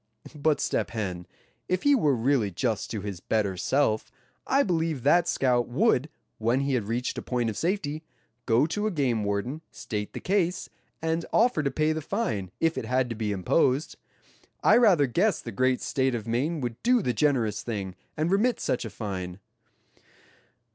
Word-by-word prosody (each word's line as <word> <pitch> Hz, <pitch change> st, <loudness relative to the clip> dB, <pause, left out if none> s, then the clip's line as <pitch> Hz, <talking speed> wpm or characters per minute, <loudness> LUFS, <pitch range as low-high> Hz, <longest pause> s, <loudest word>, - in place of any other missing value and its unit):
But 150 Hz, 0 st, +1 dB
Step -, -, 0 dB
Hen, 90 Hz, -6 st, -4 dB, 0.4 s
if 185 Hz, 0 st, 0 dB
he 285 Hz, -, +5 dB
were 150 Hz, -, +3 dB
really 120 Hz, -2 st, +1 dB
just 105 Hz, +4 st, -2 dB
to 110 Hz, -3 st, -4 dB
his 100 Hz, -3 st, -5 dB
better 100 Hz, -1 st, 0 dB
self, 110 Hz, +3 st, 0 dB, 0.4 s
I 275 Hz, +1 st, +4 dB
believe 165 Hz, -, -1 dB
that 175 Hz, 0 st, +4 dB
scout 125 Hz, -5 st, +2 dB
would, 145 Hz, -, +2 dB, 0.3 s
when 120 Hz, +4 st, +1 dB
he 140 Hz, 0 st, 0 dB
had 115 Hz, -6 st, 0 dB
reached 120 Hz, +3 st, -2 dB
a -, -, -6 dB
point 120 Hz, -3 st, -1 dB
of -, -, -8 dB
safety, 160 Hz, -, -1 dB, 0.5 s
go 115 Hz, +3 st, +4 dB
to 205 Hz, +7 st, -1 dB
a -, -, -1 dB
game 130 Hz, -, 0 dB
warden, 105 Hz, +9 st, -2 dB
state 105 Hz, -2 st, -5 dB
the -, -, -5 dB
case, 185 Hz, -2 st, 0 dB, 0.3 s
and 165 Hz, +1 st, 0 dB
offer 230 Hz, -8 st, +3 dB
to 140 Hz, -, 0 dB
pay 155 Hz, +2 st, +1 dB
the 155 Hz, -, -3 dB
fine, 115 Hz, -, -2 dB
if 165 Hz, 0 st, +1 dB
it -, -, -5 dB
had 125 Hz, +1 st, +1 dB
to -, -, -3 dB
be 110 Hz, -1 st, -2 dB
imposed. 130 Hz, -, +1 dB, 0.7 s
I -, -, +6 dB
rather 195 Hz, -12 st, +5 dB
guess 185 Hz, -, +1 dB
the 115 Hz, -, -7 dB
great 130 Hz, +4 st, +1 dB
state 130 Hz, -2 st, 0 dB
of 115 Hz, -2 st, -5 dB
Maine 140 Hz, +8 st, -1 dB
would 120 Hz, -2 st, -4 dB
do 245 Hz, -2 st, +3 dB
the 125 Hz, -, 0 dB
generous 115 Hz, -6 st, +1 dB
thing, 100 Hz, -6 st, -4 dB, 0.2 s
and 155 Hz, +3 st, 0 dB
remit 220 Hz, +5 st, +2 dB
such 125 Hz, -, -1 dB
a -, -, -4 dB
fine." 95 Hz, -4 st, -5 dB
130 Hz, 180 wpm, -27 LUFS, 110-160 Hz, 0.7 s, I